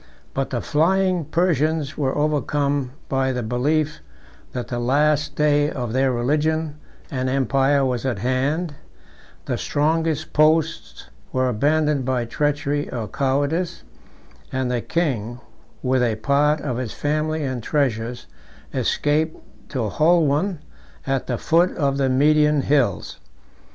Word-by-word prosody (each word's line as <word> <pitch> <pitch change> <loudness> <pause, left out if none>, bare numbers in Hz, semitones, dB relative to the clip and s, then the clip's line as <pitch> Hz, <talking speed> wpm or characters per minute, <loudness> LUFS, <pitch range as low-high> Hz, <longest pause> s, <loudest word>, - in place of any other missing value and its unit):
But 135 0 -1
the 120 -3 -2
flying 180 +2 +2
Persians 155 -2 0
were 135 -2 -1
overcome 145 -2 0 0.2
by 135 0 +1
the 125 -1 -2
belief, 145 +7 0 0.5
that 125 -1 -5
the 120 - -2
last 145 +4 +1
day 145 -1 +3
of 120 -6 -4
their 130 +1 +2
religion 150 +5 0 0.3
and 130 -1 -1
empire 135 +1 +2
was 125 -3 -1
at 130 -5 -1
hand; 140 - -1 0.7
the - - -2
strongest 160 +1 0
posts 160 +2 +1 0.3
were 130 0 +1
abandoned 150 +4 +1
by 125 -2 0
treachery 145 +2 -1
or 115 -4 -3
cowardice; 145 - -1 0.7
and 130 -1 -1
the 120 -1 0
king, 120 -9 -2 0.4
with 130 0 +2
a 115 -3 +1
part 145 +6 +2
of 125 -5 -3
his 125 -4 -4
family 155 +1 -1
and 130 -3 -3
treasures, 120 -3 -1 0.5
escaped 155 +2 0 0.3
to 130 -5 -2
Holwan 160 - +2 0.4
at 135 -1 -1
the 120 - -1
foot 170 +6 +2
of 140 -4 +1
the 135 -1 +2
Median 150 +2 +4
hills. 135 -9 0
145 Hz, 130 wpm, -22 LUFS, 130-155 Hz, 0.7 s, Median